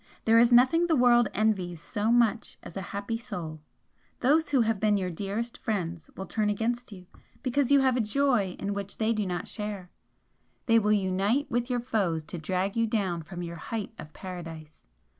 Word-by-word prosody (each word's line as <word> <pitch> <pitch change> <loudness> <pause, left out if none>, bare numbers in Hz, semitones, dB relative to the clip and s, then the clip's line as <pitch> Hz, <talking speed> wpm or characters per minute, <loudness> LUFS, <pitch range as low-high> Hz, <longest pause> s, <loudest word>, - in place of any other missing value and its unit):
There 225 +1 +6
is 235 +1 +5
nothing 260 +8 +5
the 325 - +3
world 240 -3 +5
envies 190 -5 0
so 210 +6 -1
much 235 -1 +2
as - - -10
a 195 - -3
happy 205 +3 -3
soul! 170 -10 -6 0.6
Those 305 +5 +3
who 270 -4 +3
have 225 -2 +1
been 210 -1 +3
your 185 -2 -2
dearest 205 +7 -4
friends 175 -6 -3
will 190 - -4
turn 215 0 0
against 235 +3 -2
you 185 -3 -11 0.4
because 260 +1 +1
you 280 -1 +6
have 260 -2 +3
a 250 - +2
joy 220 -4 +1
in 200 +1 -3
which 200 0 -5
they 225 +1 +1
do 210 -3 -1
not 175 -1 -3
share, 205 -4 -6 0.7
they 230 -1 +5
will 210 -1 +1
unite 200 +6 +1
with 240 +1 0
your 245 -1 0
foes 195 -10 0
to 165 +3 -7
drag 185 +4 -1
you 230 0 +2
down 195 -6 -1
from 175 +2 -7
your 170 0 -6
height 220 +2 -5
of 150 - -9
Paradise. 165 -5 -9
210 Hz, 195 wpm, -28 LUFS, 185-240 Hz, 0.7 s, There